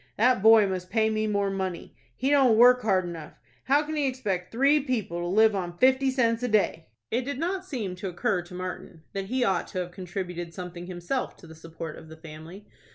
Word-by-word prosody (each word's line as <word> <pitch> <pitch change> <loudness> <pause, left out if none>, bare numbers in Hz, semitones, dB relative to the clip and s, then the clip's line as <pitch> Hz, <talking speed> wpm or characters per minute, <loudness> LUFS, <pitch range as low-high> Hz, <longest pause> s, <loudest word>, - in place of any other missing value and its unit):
"That 245 -1 +3
boy 220 0 +7
must 185 -2 -4
pay 220 -1 +2
me 215 0 0
more 200 -1 0
money. 190 -2 -4 0.2
He 265 +3 -1
don't 265 -6 +5
work 250 +2 +7
hard 190 -5 +1
enough. 165 -3 -8 0.3
How 285 +3 +3
can 310 +1 -5
he 290 -2 +1
expect 200 -9 -3
three 275 +6 +4
people 235 -11 -2
to 175 - -3
live 215 +4 +4
on 175 -3 -4
fifty 260 +3 +4
cents 230 -3 +1
a 250 - -1
day?" 205 -7 +1 0.2
It 240 - +1
did 280 +1 -4
not 365 +5 -2
seem 235 - -4
to 195 - -5
occur 180 +1 -1
to 175 +1 -12
Martin 180 -2 -7
that 195 -1 -3
he 250 +5 -1
ought 190 -5 0
to - - -8
have 180 -1 -3
contributed 175 -2 -6
something 175 -1 -7
himself 185 +8 -4
to - - -15
the 160 - -12
support 160 -1 -8
of 160 - -14
the 160 - -11
family. 160 +5 -11
195 Hz, 220 wpm, -26 LUFS, 175-250 Hz, 0.3 s, boy